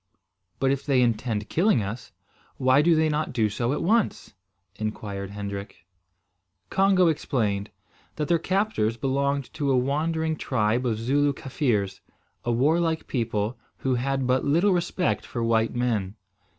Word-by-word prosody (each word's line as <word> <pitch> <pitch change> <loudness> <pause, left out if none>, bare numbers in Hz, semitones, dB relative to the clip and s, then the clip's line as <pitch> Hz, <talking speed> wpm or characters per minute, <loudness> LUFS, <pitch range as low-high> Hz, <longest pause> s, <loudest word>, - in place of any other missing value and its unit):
"But, 135 0 +2
if 135 -1 -1
they 135 -3 +2
intend 110 -2 -1
killing 175 - +2
us, 110 +4 -6 0.5
why 130 +2 +4
do 165 +2 +4
they 160 0 +3
not 150 -2 -1
do 110 -3 +2
so 120 +4 -1
at 150 - -1
once?" 220 - +1 0.4
inquired 100 -2 -4
Hendrik. 100 -3 -7 0.9
Congo 190 -1 +4
explained, 110 -10 0 0.5
that 150 -1 -2
their 170 -1 +3
captors 185 - 0
belonged 140 +1 -1
to 145 -3 -1
a 130 - +3
wandering 160 +4 0
tribe 120 -1 0
of 110 -3 0
Zooloo 140 +5 +1
Kaffirs, 120 -9 -1 0.4
a 120 - 0
warlike 160 +6 +1
people, 115 -1 -2 0.2
who 130 - -1
had 135 +2 0
but 130 +1 +2
little 170 +8 +3
respect 175 +1 0
for 120 - -4
white 115 0 +1
men. 110 -5 -1
130 Hz, 145 wpm, -25 LUFS, 110-155 Hz, 0.9 s, why